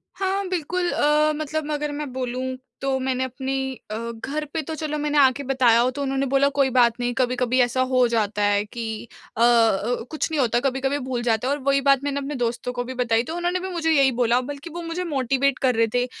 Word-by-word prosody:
हाँ 390 Hz, 0 st, -1 dB
बिल्कुल, 355 Hz, 0 st, -1 dB
अ, 300 Hz, +1 st, +3 dB
मतलब 310 Hz, 0 st, -3 dB
अगर 295 Hz, 0 st, -2 dB
मैं 290 Hz, -1 st, -5 dB
बोलूँ 255 Hz, 0 st, -3 dB, 0.2 s
तो 270 Hz, -1 st, 0 dB
मैंने 260 Hz, 0 st, -1 dB
अपनी 265 Hz, +1 st, -3 dB, 0.2 s
अ, -, -, -2 dB, 0.3 s
घर 300 Hz, +3 st, -3 dB
पे 320 Hz, -, -1 dB
तो 315 Hz, +2 st, -6 dB
चलो 305 Hz, -1 st, -3 dB
मैंने 295 Hz, 0 st, -1 dB
आके 275 Hz, 0 st, +4 dB
बताया 255 Hz, -4 st, +3 dB
हो 245 Hz, +1 st, +3 dB
तो 285 Hz, -, -3 dB
उन्होंने 270 Hz, 0 st, 0 dB
बोला 275 Hz, +1 st, +3 dB
कोई 270 Hz, -1 st, +4 dB
बात 235 Hz, -1 st, +4 dB
नहीं, 245 Hz, 0 st, -1 dB
कभी-कभी 250 Hz, 0 st, +1 dB
ऐसा 245 Hz, +1 st, +1 dB
हो 255 Hz, -1 st, +3 dB
जाता 215 Hz, -3 st, 0 dB
है 205 Hz, 0 st, +2 dB
कि 230 Hz, +2 st, -7 dB, 0.5 s
अ, -, -, -1 dB
कुछ 235 Hz, +4 st, +2 dB
नहीं 310 Hz, -, 0 dB
होता 240 Hz, -1 st, +2 dB
कभी-कभी 270 Hz, +1 st, 0 dB
भूल 250 Hz, -2 st, -2 dB
जाते 230 Hz, +1 st, +1 dB
हैं -, -, +1 dB
और 290 Hz, -, -3 dB
वही 275 Hz, 0 st, +2 dB
बात 275 Hz, -1 st, +4 dB
मैंने 285 Hz, 0 st, -1 dB
अपने 280 Hz, +1 st, -4 dB
दोस्तों 245 Hz, 0 st, -2 dB
को 245 Hz, 0 st, -2 dB
भी 255 Hz, +1 st, -6 dB
बताई। 235 Hz, -2 st, +1 dB
तो 320 Hz, +6 st, -6 dB
उन्होंने 350 Hz, +1 st, -1 dB
भी 375 Hz, +1 st, -5 dB
मुझे 330 Hz, -3 st, 0 dB
यही 275 Hz, -4 st, +4 dB
बोला, 240 Hz, 0 st, +3 dB
बल्कि 285 Hz, +5 st, -7 dB
वो 345 Hz, -, -5 dB
मुझे 335 Hz, +2 st, -4 dB
मोटिवेट 275 Hz, -3 st, 0 dB
कर 255 Hz, -2 st, +2 dB
रहे 225 Hz, 0 st, +3 dB
थे 245 Hz, 0 st, +2 dB
265 Hz, 225 wpm, -23 LUFS, 245-295 Hz, 0.5 s, आके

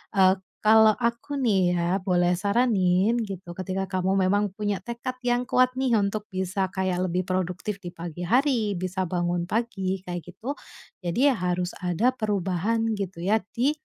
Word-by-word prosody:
eee, 190 Hz, -1 st, +6 dB, 0.2 s
kalo 220 Hz, 0 st, +6 dB
aku 235 Hz, +4 st, -2 dB
nih 195 Hz, -8 st, +3 dB
ya 180 Hz, +2 st, 0 dB
boleh 180 Hz, -2 st, +2 dB
saranin 200 Hz, 0 st, +2 dB
gitu, 190 Hz, -4 st, -7 dB
ketika 190 Hz, +1 st, -3 dB
kamu 185 Hz, 0 st, +1 dB
memang 205 Hz, +1 st, +1 dB
punya 205 Hz, -1 st, -3 dB
tekad 240 Hz, +3 st, -5 dB
yang 245 Hz, 0 st, +1 dB
kuat 255 Hz, -1 st, +3 dB
nih 260 Hz, -3 st, +2 dB
untuk 210 Hz, 0 st, 0 dB
bisa 190 Hz, 0 st, -1 dB
kayak 185 Hz, -1 st, -1 dB
lebih 180 Hz, +1 st, -1 dB
produktif 185 Hz, +2 st, -2 dB
di 175 Hz, -2 st, -9 dB
pagi 170 Hz, +1 st, -6 dB
hari, 240 Hz, -, +2 dB
bisa 185 Hz, +1 st, -2 dB
bangun 175 Hz, 0 st, -1 dB
pagi 195 Hz, -4 st, -2 dB
kayak 175 Hz, -1 st, -4 dB
gitu, 225 Hz, -, -7 dB, 0.4 s
jadi 235 Hz, +11 st, +2 dB
harus 180 Hz, -4 st, -1 dB
ada 180 Hz, +8 st, +1 dB
perubahan 215 Hz, 0 st, -1 dB
gitu 195 Hz, -5 st, -4 dB
ya 210 Hz, +4 st, +3 dB, 0.2 s
di, 255 Hz, +5 st, +3 dB
195 Hz, 155 wpm, -26 LUFS, 180-220 Hz, 0.4 s, eee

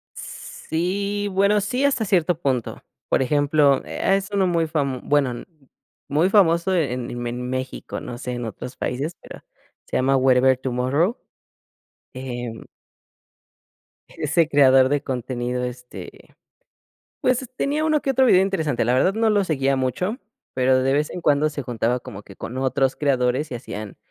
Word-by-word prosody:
Sí 200 Hz, +5 st, -3 dB
bueno, 200 Hz, +2 st, +3 dB
sí, 250 Hz, +6 st, -1 dB
hasta 255 Hz, -6 st, +1 dB
cierto 175 Hz, -3 st, +1 dB
punto, 130 Hz, -7 st, -2 dB, 0.3 s
por -, -, +2 dB
ejemplo, 145 Hz, 0 st, +3 dB
e 195 Hz, -, 0 dB
es 195 Hz, +1 st, -2 dB
uno 195 Hz, -2 st, +2 dB
muy 165 Hz, -2 st, +1 dB
fam 140 Hz, -5 st, -1 dB
bueno, 135 Hz, -5 st, +1 dB, 0.6 s
muy 155 Hz, +6 st, +2 dB
famoso 185 Hz, -2 st, +3 dB
en 125 Hz, -7 st, -1 dB
en 120 Hz, 0 st, -5 dB
en 125 Hz, +1 st, -4 dB
México, 130 Hz, 0 st, -4 dB
no 120 Hz, -1 st, -7 dB
sé 125 Hz, -1 st, -4 dB
en 120 Hz, -1 st, -4 dB
otros 125 Hz, +4 st, -7 dB
países, 145 Hz, +7 st, -3 dB
pero -, -, -12 dB, 0.4 s
se -, -, -1 dB
llama 135 Hz, +1 st, +2 dB
Werevertumorro, 130 Hz, -, +2 dB, 1.0 s
eh 125 Hz, -2 st, -5 dB, 1.6 s
ese 155 Hz, +2 st, +1 dB
creador 135 Hz, -3 st, +5 dB
de 145 Hz, 0 st, +1 dB
contenido, 125 Hz, -1 st, -3 dB
este, 125 Hz, -6 st, -9 dB, 0.9 s
pues, 255 Hz, -1 st, +1 dB
tenía 300 Hz, +3 st, 0 dB
uno 310 Hz, -2 st, +2 dB
que 270 Hz, -, -1 dB
otro 265 Hz, 0 st, +3 dB
video 185 Hz, -5 st, +6 dB
interesante, 160 Hz, -11 st, 0 dB
la 125 Hz, +2 st, +2 dB
verdad 185 Hz, +9 st, +3 dB
no 225 Hz, 0 st, +2 dB
lo 205 Hz, -1 st, +3 dB
seguía 135 Hz, -4 st, +1 dB
mucho, 180 Hz, -, -1 dB, 0.4 s
pero 130 Hz, 0 st, +3 dB
de 135 Hz, -, +2 dB
vez 150 Hz, +2 st, +1 dB
en 180 Hz, -, -6 dB
cuando 150 Hz, 0 st, +2 dB
se 145 Hz, -2 st, -5 dB
juntaba 120 Hz, 0 st, -1 dB
como 100 Hz, -2 st, -9 dB
que 100 Hz, -, -15 dB
con 125 Hz, -, -7 dB
otros 135 Hz, 0 st, +1 dB
creadores 135 Hz, 0 st, 0 dB
y -, -, -4 dB
hacían, 105 Hz, -4 st, -8 dB
140 Hz, 155 wpm, -22 LUFS, 125-180 Hz, 1.6 s, video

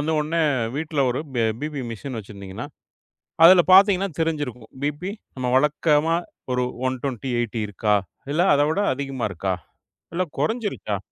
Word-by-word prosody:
வந்து 155 Hz, +2 st, 0 dB
உடனே 165 Hz, +2 st, 0 dB, 0.3 s
வீட்ல 155 Hz, -1 st, -2 dB
ஒரு 130 Hz, -, -2 dB, 0.2 s
ப 115 Hz, -, +2 dB, 0.2 s
பிபி 150 Hz, -3 st, -3 dB
மிஷின் 120 Hz, +2 st, -6 dB
வச்சிருந்தீங்கனா, 100 Hz, +3 st, -8 dB, 0.8 s
அதுல 180 Hz, 0 st, +9 dB
பாத்தீங்கன்னா 195 Hz, 0 st, +6 dB
தெரிஞ்சிருக்கும். 145 Hz, -8 st, -2 dB
பிபி 150 Hz, +7 st, -2 dB, 0.3 s
நம்ம 125 Hz, -1 st, -1 dB
வழக்கமா 150 Hz, +3 st, +3 dB, 0.4 s
ஒரு 125 Hz, 0 st, +1 dB, 0.2 s
120 130 Hz, -1 st, -3 dB
80 115 Hz, -1 st, -2 dB
இருக்கா, 105 Hz, +1 st, +1 dB, 0.4 s
இல்ல 170 Hz, +4 st, +2 dB
அதவிட 155 Hz, +7 st, +2 dB
அதிகமா 135 Hz, -4 st, -3 dB
இருக்கா? 95 Hz, +1 st, -1 dB, 0.6 s
இல்ல 185 Hz, +2 st, +1 dB, 0.2 s
கொறஞ்சிருக்கா? 215 Hz, -, -1 dB
145 Hz, 130 wpm, -23 LUFS, 120-165 Hz, 0.8 s, அதுல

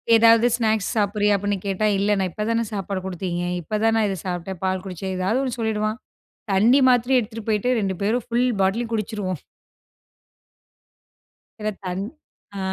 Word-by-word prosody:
ஏதாவது 230 Hz, +1 st, +6 dB
ஸ்நாக்ஸ் 220 Hz, -3 st, 0 dB
சாப்பிடுறியா 205 Hz, -1 st, +2 dB
அப்படின்னு 205 Hz, 0 st, -1 dB
கேட்டா, 200 Hz, +2 st, 0 dB
இல்ல 200 Hz, +1 st, +1 dB
நான் 190 Hz, -1 st, 0 dB
இப்பதானே 230 Hz, +4 st, 0 dB
சாப்பாடு 195 Hz, -1 st, -3 dB
குடுத்தீங்க, 180 Hz, -1 st, -3 dB, 0.2 s
இப்ப 210 Hz, +6 st, -3 dB
தான் 225 Hz, 0 st, +3 dB
நான் 220 Hz, -2 st, +2 dB
இத 195 Hz, -, -3 dB
சாப்பிட்டேன், 180 Hz, 0 st, -4 dB
பால் 185 Hz, -1 st, 0 dB
குடிச்சேன், 190 Hz, 0 st, -4 dB
ஏதாவது 195 Hz, +8 st, +1 dB
ஒன்னு 255 Hz, -3 st, -3 dB
சொல்லிடுவான். 215 Hz, 0 st, -1 dB, 0.5 s
தண்ணி 235 Hz, +8 st, +5 dB
மாத்ரி 250 Hz, +1 st, +3 dB
எடுத்துட்டு 225 Hz, -1 st, -6 dB
போயிட்டு, 215 Hz, +3 st, +1 dB
2 195 Hz, -2 st, -1 dB
பேரும் 225 Hz, +3 st, 0 dB
ஃபுல் 240 Hz, +2 st, +1 dB, 0.2 s
பாட்டிலும் 225 Hz, +5 st, 0 dB
குடிச்சிருவோம். 205 Hz, -, -3 dB, 2.2 s
சில 215 Hz, -, 0 dB, 0.2 s
தண் 185 Hz, +1 st, -2 dB, 0.5 s
அ -, -, -4 dB
210 Hz, 150 wpm, -23 LUFS, 190-225 Hz, 2.2 s, ஏதாவது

